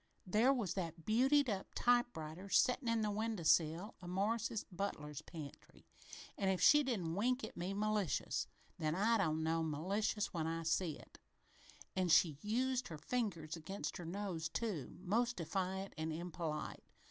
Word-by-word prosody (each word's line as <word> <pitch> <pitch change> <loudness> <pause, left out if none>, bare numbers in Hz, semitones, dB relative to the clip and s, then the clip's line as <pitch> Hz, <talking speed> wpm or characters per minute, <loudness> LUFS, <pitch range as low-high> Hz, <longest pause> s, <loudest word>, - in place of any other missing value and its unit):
There 215 +8 +4
was 225 -10 0
that 165 -3 -4
beautied 265 +6 +4
up 200 -4 -2
typewriter 200 -8 +1
settin' 250 +5 +3
in 230 -1 +2
the 210 -1 0
window 215 -3 -2
sill 165 +6 +3
o' 180 - -8
Morris's 215 +4 0
butler's 170 -6 -4
pantry 155 -5 -10 0.5
an' 195 - +2
if 190 -1 +1
she 295 - +7
didn't 205 - -1
wink 250 +7 +1
at - - -6
me 185 +3 -3
malicious, 210 - 0 0.3
then 155 -1 0
I 225 +4 +3
don't 160 -4 +1
know 165 +1 +1
malice 190 +7 -1
when 160 -2 -1
I 165 0 -2
see 165 -1 0
it. - - -16 0.8
An' 185 -1 +1
she 160 -3 +5
used 250 +4 0
her 160 - -6
fingers 175 -6 -2
against 170 +5 -5
her 175 - -7
nose, 175 -4 -3
too, 195 - -3
most 235 +6 +1
defiant 190 +3 -2
and 160 0 -1
impolite. 165 -1 -4
190 Hz, 160 wpm, -37 LUFS, 165-220 Hz, 0.8 s, she